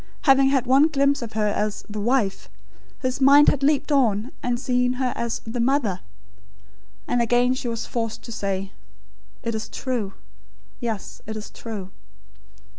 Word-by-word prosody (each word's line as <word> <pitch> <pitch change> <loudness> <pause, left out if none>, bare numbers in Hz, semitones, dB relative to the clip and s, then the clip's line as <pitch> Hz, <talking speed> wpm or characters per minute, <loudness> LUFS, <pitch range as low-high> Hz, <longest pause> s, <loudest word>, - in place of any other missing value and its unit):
Having 270 -1 +5
had 265 -2 +2
one 270 +4 +5
glimpse 280 -2 +2
of 230 -2 -6
her 215 -1 0
as 210 0 -2
"The 210 0 -5
Wife," 230 -3 0 0.5
his 255 +1 -1
mind 280 +2 +7
had 280 - 0
leaped 290 +1 +2
on, 240 -4 +2
and 245 -1 -1
seen 250 0 +1
her 255 0 -1
as 235 -1 -2
"The 230 +2 -4
Mother." 235 -7 +1 1.1
And 245 - +1
again 245 +2 +3
she 255 -1 -4
was 230 -1 -3
forced 225 -2 -3
to 235 - -9
say: 195 -3 -3 0.7
"It 230 -1 -2
is 220 0 -4
true 235 -7 -3 0.7
yes; 225 -4 -5
it 220 0 -4
is 215 - -8
true." 205 -5 -7
240 Hz, 160 wpm, -23 LUFS, 215-265 Hz, 1.1 s, mind